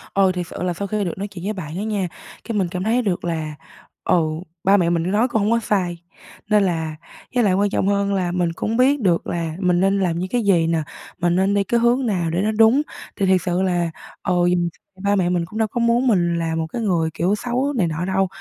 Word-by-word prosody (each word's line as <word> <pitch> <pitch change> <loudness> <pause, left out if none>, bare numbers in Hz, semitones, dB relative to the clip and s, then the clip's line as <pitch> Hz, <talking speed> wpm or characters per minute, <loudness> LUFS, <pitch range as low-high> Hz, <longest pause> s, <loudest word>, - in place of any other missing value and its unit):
Ờ, 195 -1 +4
thiệt 180 -2 -4
sự - - -6
là 180 -1 0
sau 200 +3 -4
khi 210 +1 -1
được 175 - -3
nói 200 +2 -3
chuyện 185 -3 -10
với 210 - -1
bạn 165 -4 -6
đó 195 - -2
nha, 210 -4 -1 0.4
cái 225 -2 -3
mình 190 - +1
cảm 180 0 -3
thấy 230 +4 +2
được 195 -7 -2
là, 160 -3 -3 0.5
ừ, - - +3 0.5
ba 195 +1 +5
mẹ 170 -3 +2
mình 170 +2 0
nói 220 +4 +3
cũng 220 -4 0
hổng 210 +2 +1
có 230 - +3
sai. 180 -6 -1 0.5
Nên 210 -1 +4
là 160 -4 -1 0.4
với 245 - +4
lại 195 - +3
quan 200 +2 +2
trọng 195 - 0
hơn 200 0 +1
là 180 -3 0
mình 175 -2 0
cũng 225 +6 -2
biết 270 +3 +4
được 175 -5 +1
là 165 -2 -3
mình 180 -2 +2
nên 195 +1 +2
làm 170 -3 0
như 185 - -2
cái 240 +2 0
gì 175 -5 +3
nè, 165 -2 +1 0.4
mình 175 0 +2
nên 190 +2 +2
đi 200 0 +2
cái 235 +4 +1
hướng 240 +3 +2
nào 180 -7 0
để 175 - 0
nó 215 +2 +1
đúng, 225 +6 +5 0.3
thì 195 - 0
thiệt 185 -1 +3
sự 180 +1 0
là, 175 -2 +1 0.3
ừ, 185 - 0 0.7
ba 200 0 +2
mẹ 180 -3 +1
mình 175 -2 0
cũng 220 +6 -7
đâu 220 - +2
có 240 - -4
muốn 235 +2 +2
mình 175 -6 +2
là 165 -1 -1
một 160 0 -1
cái 230 +9 -5
người, 170 -6 +1
kiểu, 185 +5 +1
xấu 255 +5 -1
này 180 -6 +2
nọ 160 +2 -3
đâu. 190 +1 +1
190 Hz, 260 wpm, -21 LUFS, 175-215 Hz, 0.7 s, ba